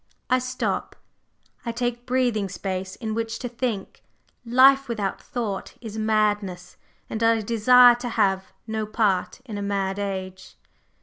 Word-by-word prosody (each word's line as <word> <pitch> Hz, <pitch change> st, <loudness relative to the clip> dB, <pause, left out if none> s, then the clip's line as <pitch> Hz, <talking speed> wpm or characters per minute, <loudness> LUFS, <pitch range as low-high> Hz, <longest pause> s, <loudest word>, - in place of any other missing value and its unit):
I 255 Hz, -, +5 dB
stop, 255 Hz, 0 st, -3 dB, 0.7 s
I 235 Hz, -, -2 dB
take 240 Hz, 0 st, -3 dB
breathing 245 Hz, -6 st, +1 dB
space 190 Hz, 0 st, -4 dB
in 220 Hz, -3 st, -4 dB
which 225 Hz, 0 st, -2 dB
to 245 Hz, -, -4 dB
think; 235 Hz, -4 st, -4 dB, 0.4 s
life 265 Hz, +3 st, +5 dB
without 210 Hz, -5 st, -3 dB
thought 225 Hz, -7 st, -4 dB
is 220 Hz, -3 st, -8 dB
madness, 210 Hz, -4 st, 0 dB, 0.3 s
and 220 Hz, -, -5 dB
I 225 Hz, 0 st, +3 dB
desire 240 Hz, +3 st, +6 dB
to 245 Hz, 0 st, -4 dB
have 190 Hz, -4 st, +1 dB
no 220 Hz, -1 st, -3 dB
part 210 Hz, 0 st, 0 dB
in 215 Hz, -5 st, -5 dB
a -, -, -4 dB
mad 200 Hz, -1 st, -1 dB
age." 190 Hz, -2 st, -5 dB
220 Hz, 140 wpm, -24 LUFS, 200-245 Hz, 0.7 s, desire